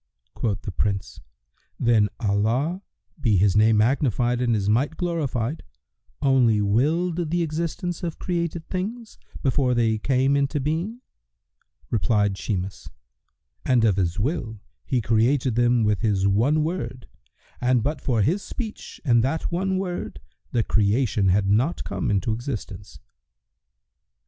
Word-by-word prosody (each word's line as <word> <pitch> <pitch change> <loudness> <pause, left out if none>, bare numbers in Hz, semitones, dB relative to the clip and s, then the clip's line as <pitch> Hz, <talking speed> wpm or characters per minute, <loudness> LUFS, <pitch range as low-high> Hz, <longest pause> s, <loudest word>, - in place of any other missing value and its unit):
Quoth 105 -4 -2
the 100 - -4
Prince, 100 +1 -2 0.6
"Then 110 -3 +3
Allah 115 - 0 0.4
(be 115 -8 +2
His 95 +1 +3
name 110 +1 +5
magnified 120 0 +1
and 120 -2 +2
His 100 -2 -1
might 130 +9 +1
glorified!) 155 -6 -2 0.6
only 125 -6 +4
willed 160 - +1
the 175 +1 +1
existence 170 +2 -3
of 170 -3 -4
created 170 -2 -3
things, 215 +5 -5 0.2
before 130 -1 +2
they 110 -2 +1
came 135 +3 +2
into 140 +1 0
being?" 165 - -2 0.9
Replied 105 -3 +1
Shimas, 95 -2 -4 0.7
"And 120 -3 +3
of 100 -4 +2
His 90 -1 0
will, 110 - -2 0.3
He 130 -3 0
created 120 +4 +2
them 120 0 +3
with 105 -2 +1
His 100 -4 +1
one 125 +10 +2
Word 130 -7 -4 0.5
and 125 -2 +2
but 150 +3 -2
for 115 -6 +1
His 180 - +1
speech 220 -1 -7
and 120 -4 +4
that 155 +7 -1
one 190 +2 0
Word, 185 -2 -4 0.3
the 115 - +1
creation 105 0 +1
had 95 +2 +3
not 120 - +1
come 95 -2 -3
into 105 +2 +1
existence." 110 -5 -6
125 Hz, 135 wpm, -24 LUFS, 105-155 Hz, 0.9 s, name